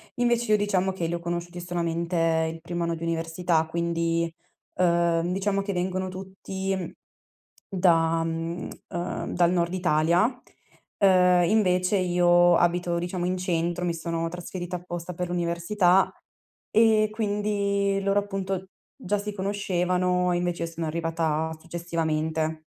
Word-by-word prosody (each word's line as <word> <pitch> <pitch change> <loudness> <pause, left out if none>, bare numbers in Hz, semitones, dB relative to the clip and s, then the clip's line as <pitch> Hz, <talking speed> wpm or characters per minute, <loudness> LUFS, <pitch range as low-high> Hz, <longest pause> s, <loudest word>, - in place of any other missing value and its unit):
Invece 240 -2 +1
io 210 - +6
diciamo 190 -2 +1
che 175 -3 -3
li 170 - -2
ho 170 - -2
conosciuti 175 +1 -4
solamente 170 -1 0
il 165 - -10
primo 170 +1 -4
anno 170 0 -1
di 165 - -8
università, 165 0 0
quindi, 170 0 -1 0.4
uhm, 170 -1 +2
diciamo 195 +1 0
che 200 0 -3
vengono 185 +1 -1
tutti, 190 0 -5 0.8
da, 165 -4 +3
mhmm, 165 +1 -3 0.2
ehm, 175 0 -4
dal 175 -1 +4
Nord 170 0 0
Italia. 170 +1 +3 0.8
Uhm, 180 -2 +5
invece 185 -2 +2
io 175 -1 +4
abito, 175 0 +1
diciamo 175 0 -3
in 185 +1 0
centro, 175 0 -1
mi 170 - 0
sono 165 0 -2
trasferita 175 +1 -6
apposta 175 0 -6
per 180 +1 -4
l'università 175 +2 +2 0.6
e 220 -1 +5
quindi 205 -2 0
loro 195 +1 +2
appunto, 195 -2 -4 0.3
già 210 -7 -1
si 210 +1 -4
conoscevano 180 -2 0
e 175 - +1
invece 175 -1 -1
io 165 - -3
sono 165 -1 -4
arrivata 160 -1 -1
successivamente. 160 -2 -2
175 Hz, 135 wpm, -26 LUFS, 170-190 Hz, 0.8 s, io